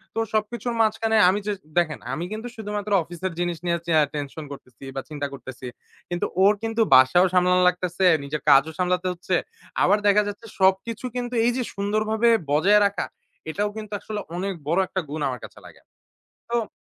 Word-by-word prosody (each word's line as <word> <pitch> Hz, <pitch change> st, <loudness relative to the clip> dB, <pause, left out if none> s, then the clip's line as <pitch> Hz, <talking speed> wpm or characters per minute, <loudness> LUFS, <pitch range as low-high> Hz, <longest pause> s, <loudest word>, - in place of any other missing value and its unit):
তো -, -, 0 dB
সবকিছুর 235 Hz, +3 st, -1 dB
মাঝখানে 220 Hz, 0 st, +1 dB
আমি 200 Hz, +2 st, +1 dB
য -, -, 0 dB, 0.3 s
দেখেন 160 Hz, -3 st, +1 dB
আমি 165 Hz, +5 st, -3 dB
কিন্তু 220 Hz, +3 st, -5 dB
শুধুমাত্র 210 Hz, -1 st, -5 dB
অফিসের 175 Hz, +2 st, -5 dB
জিনিস 175 Hz, -1 st, -1 dB
নিয়েছি 170 Hz, -1 st, -1 dB
চেয়া 160 Hz, -2 st, +4 dB
টেনশন 145 Hz, +2 st, -5 dB
করতেছি 125 Hz, -3 st, -12 dB
বা 135 Hz, -, -2 dB
চিন্তা 145 Hz, -2 st, -3 dB
করতেছি। 130 Hz, -1 st, -9 dB, 0.4 s
কিন্তু 175 Hz, 0 st, -1 dB, 0.2 s
ওর 205 Hz, +2 st, +6 dB
কিন্তু 225 Hz, 0 st, 0 dB
বাসাও 130 Hz, +8 st, +6 dB
সামলানো 180 Hz, 0 st, +4 dB
লাগতেছে, 180 Hz, +1 st, -2 dB, 0.2 s
নিজের 150 Hz, +2 st, -4 dB
কাজও 140 Hz, +4 st, +6 dB
সামলাতে 180 Hz, 0 st, 0 dB
হচ্ছে। 180 Hz, +1 st, -2 dB, 0.5 s
আবার 200 Hz, +3 st, +4 dB
দেখা 205 Hz, +1 st, +5 dB
যাচ্ছে, 205 Hz, +3 st, -7 dB
সবকিছু 190 Hz, +6 st, +1 dB
কিন্তু 245 Hz, 0 st, -3 dB
এই 245 Hz, -, +4 dB
যে, 250 Hz, -, 0 dB
সুন্দরভাবে 215 Hz, +3 st, +1 dB, 0.2 s
বজায় 195 Hz, +8 st, +5 dB
রাখা 200 Hz, -1 st, -1 dB, 0.4 s
এটাও 205 Hz, +6 st, -1 dB
কিন্তু 215 Hz, -1 st, -7 dB
আসলে 215 Hz, -1 st, -5 dB, 0.2 s
অনেক 195 Hz, +2 st, -2 dB
বড় 170 Hz, +4 st, +2 dB
একটা 190 Hz, -, -2 dB
গুণ 150 Hz, +1 st, -4 dB
আমার 125 Hz, -2 st, -4 dB
কাছে -, -, -14 dB
লাগে। -, -, -15 dB, 0.7 s
তো 235 Hz, -3 st, 0 dB
190 Hz, 175 wpm, -24 LUFS, 160-215 Hz, 0.7 s, ওর